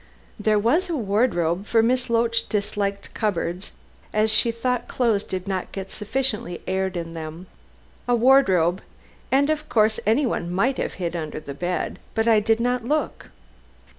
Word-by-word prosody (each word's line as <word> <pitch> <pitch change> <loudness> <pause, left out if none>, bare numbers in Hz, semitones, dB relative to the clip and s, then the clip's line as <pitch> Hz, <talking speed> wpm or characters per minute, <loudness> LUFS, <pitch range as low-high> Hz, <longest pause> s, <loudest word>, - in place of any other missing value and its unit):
"There 215 0 +2
was 310 - +2
a 335 - -1
wardrobe, 200 - 0
for 225 -1 +3
Miss 250 +2 +1
Loach 230 0 +1
disliked 200 -1 -2
cupboards, 185 -3 -2 0.4
as 215 +1 +2
she 220 +2 +4
thought 250 +1 -2
clothes 225 -5 +1
did 185 0 -5
not 190 -2 -3
get 195 -1 -6
sufficiently 210 -5 -2
aired 190 -1 -1
in 165 -1 -5
them. 160 +2 -7 0.6
A 245 - +3
wardrobe, 195 -9 +4 0.5
and 280 +3 +3
of 305 0 -3
course 215 -1 +3
anyone 225 -7 +1
might 235 +9 +1
have - - -2
hid 175 -2 -3
under 155 -2 -4
the 140 -2 -8
bed, 175 +5 -3 0.2
but 225 +1 +1
I 225 -2 +6
did 225 +2 +1
not 245 0 0
look. 300 +6 -2
215 Hz, 160 wpm, -23 LUFS, 185-240 Hz, 0.6 s, I